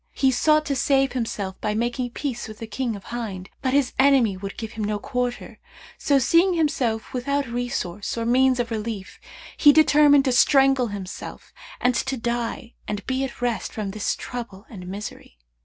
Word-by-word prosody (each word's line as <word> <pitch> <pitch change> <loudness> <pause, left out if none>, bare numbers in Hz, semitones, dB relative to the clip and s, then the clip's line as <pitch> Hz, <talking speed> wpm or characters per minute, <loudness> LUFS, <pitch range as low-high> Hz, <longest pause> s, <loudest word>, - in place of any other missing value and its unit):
He 265 -1 +2
sought 305 +4 +3
to 280 - -1
save 270 0 +2
himself 215 -6 -4
by 210 0 -1
making 240 +2 -1
peace 240 -1 -4
with 215 -1 -10
the 225 - -6
King 230 +1 -3
of 200 - -10
Hind, 200 -6 -6
but 260 - 0
his 280 -3 +2
enemy 265 -7 +4
would 195 +1 -7
give 225 -1 -5
him 225 -1 -5
no 210 0 -1
quarter; 245 +3 -4 0.4
so 280 - +3
seeing 335 +8 +3
himself 260 -9 -1
without 280 +3 -1
resource 235 -5 -3
or 230 - -2
means 255 +1 +3
of 235 -1 -2
relief, 215 -3 -5 0.4
he 295 - +7
determined 290 -2 +5
to 260 - +2
strangle 270 0 +4
himself 200 -3 -8 0.3
and 250 +1 +2
to 265 +2 -1
die 235 0 -3
and 205 -1 -4
be 260 +1 -1
at 255 -2 -6
rest 235 -5 -1
from 210 -3 -4
this 210 +1 -1
trouble 230 -5 -7
and 180 -5 -9
misery. 195 - -8
240 Hz, 180 wpm, -24 LUFS, 215-270 Hz, 0.4 s, he